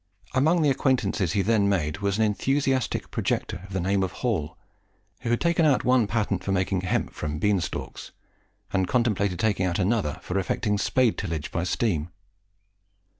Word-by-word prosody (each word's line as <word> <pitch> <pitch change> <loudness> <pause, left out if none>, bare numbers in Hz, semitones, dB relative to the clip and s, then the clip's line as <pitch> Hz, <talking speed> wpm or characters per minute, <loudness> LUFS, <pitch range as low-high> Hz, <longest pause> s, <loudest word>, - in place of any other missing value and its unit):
Among 155 +5 +3
the 145 - +4
acquaintances 115 - +1
he 100 - +2
then 105 -1 +3
made 80 -4 0
was 100 0 0
an 110 - +3
enthusiastic 130 +4 0
projector - - -2
of - - -15
the 95 - 0
name 95 +2 +1
of 95 -1 -2
Hall, 90 -7 -1 0.6
who 120 - -4
had 120 - +2
taken 170 -1 +2
out 145 -5 +3
one 125 -3 +3
patent 100 -3 -1
for 100 - -2
making 95 0 0
hemp 95 - -1
from 75 0 -4
bean 100 +2 +2
stalks, - - -6 0.6
and 95 -1 +1
contemplated 100 -5 +1
taking 100 -4 +1
out 85 - -1
another 95 -5 0
for 95 +2 -1
effecting 105 +2 -1
spade 125 0 +2
tillage 80 -6 -4
by 85 - -1
steam. 90 -5 0
100 Hz, 175 wpm, -26 LUFS, 90-120 Hz, 0.6 s, the